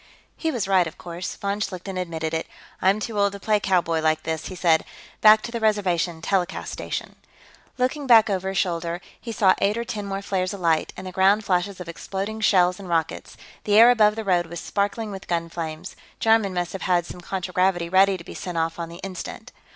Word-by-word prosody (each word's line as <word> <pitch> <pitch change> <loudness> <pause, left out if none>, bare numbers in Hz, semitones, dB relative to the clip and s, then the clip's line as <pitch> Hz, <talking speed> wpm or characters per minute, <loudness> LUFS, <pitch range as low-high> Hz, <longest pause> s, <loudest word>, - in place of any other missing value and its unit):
He 325 - -2
was 240 -10 -2
right, 185 -3 +3
of 160 - -9
course. 175 +1 -6
Von 200 +1 -3
Schlichten 190 -2 -4
admitted 165 -3 -3
it. 160 - -2 0.3
"I'm 195 +3 +3
too 215 -1 -3
old 200 0 +2
to 200 - -7
play 210 +1 +1
cowboy, 175 -5 +1
like 155 0 +1
this," 160 -1 -3
he 185 - -7
said. 170 -3 +3 0.4
"Back 215 0 +7
to 235 - -5
the 235 - -3
Reservation, 180 -6 0
telecast 190 -3 -1
station." - - -5 0.6
Looking 260 +3 -1
back 225 -3 +7
over 190 -2 -1
his 195 - -3
shoulder, 170 -2 -1 0.2
he 235 - -6
saw 195 -4 +4
eight 205 +3 +1
or 235 - -1
ten 210 -3 -5
more 195 0 -4
flares 185 -1 -1
alight, 165 -4 +1
and 185 - -7
the 185 - -6
ground 195 +3 +3
flashes 185 +1 0
of 180 - -7
exploding 195 +5 -5
shells 180 -3 +3
and 190 -3 -9
rockets; 165 -2 -2 0.3
the 205 0 +3
air 235 +2 +9
above 215 -3 +4
the 225 - -4
road 175 -3 +2
was 170 0 -6
sparkling 205 +3 -2
with 195 -1 -8
gun 170 -1 -1
flames. 165 +2 -6 0.2
Jarman 220 -4 +3
must 175 -1 -2
have 195 - -5
had 175 -2 +1
some 180 - -9
contragravity 180 -1 0
ready 190 +2 +4
to 170 - -11
be - - -10
sent 180 -2 -5
off 165 +1 -1
on 165 -1 -4
the 170 - -10
instant. 190 -2 -7
190 Hz, 215 wpm, -24 LUFS, 175-205 Hz, 0.6 s, air